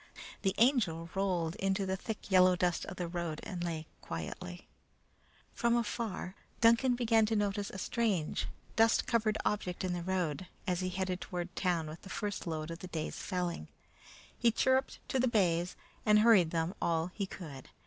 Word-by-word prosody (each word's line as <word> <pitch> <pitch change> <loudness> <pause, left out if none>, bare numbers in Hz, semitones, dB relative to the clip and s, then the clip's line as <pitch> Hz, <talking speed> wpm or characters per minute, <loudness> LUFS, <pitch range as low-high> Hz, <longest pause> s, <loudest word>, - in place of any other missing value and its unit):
The 195 -2 +1
Angel 195 - +2
rolled 180 -4 0
into 195 -1 0
the 190 0 0
thick 210 +1 -6
yellow 185 -1 +6
dust 175 -1 0
of 185 - -7
the 175 - -2
road 170 -2 -3
and 180 -4 -4
lay 165 -2 -3 0.2
quietly. 175 - -6 0.9
From 235 0 +2
afar, 225 -5 -2 0.3
Duncan 235 +2 +5
began 225 -2 +3
to 220 - +1
notice 205 -1 0
a - - -7
strange, 195 -6 0 0.3
dust 225 0 +4
covered 220 -3 +1
object 190 -3 -1
in 185 -1 0
the 175 - -2
road, 180 -2 -1 0.2
as 180 -3 0
he 185 -1 -1
headed 185 0 -2
toward 175 0 -5
town 175 -4 +1
with 155 +2 -8
the 190 - -11
first 205 -2 -3
load 160 0 -3
of 165 - -6
the 185 - -7
day's 160 -3 -4
felling. 175 - -2 0.7
He 235 - +3
chirruped 260 +3 +2
to 265 - +1
the 255 - +3
bays 180 -6 +2 0.3
and 210 0 +6
hurried 215 -7 +6
them 165 +2 -1
all 165 +1 +1
he 200 -2 -2
could. 150 -9 -9
185 Hz, 175 wpm, -33 LUFS, 170-215 Hz, 0.9 s, yellow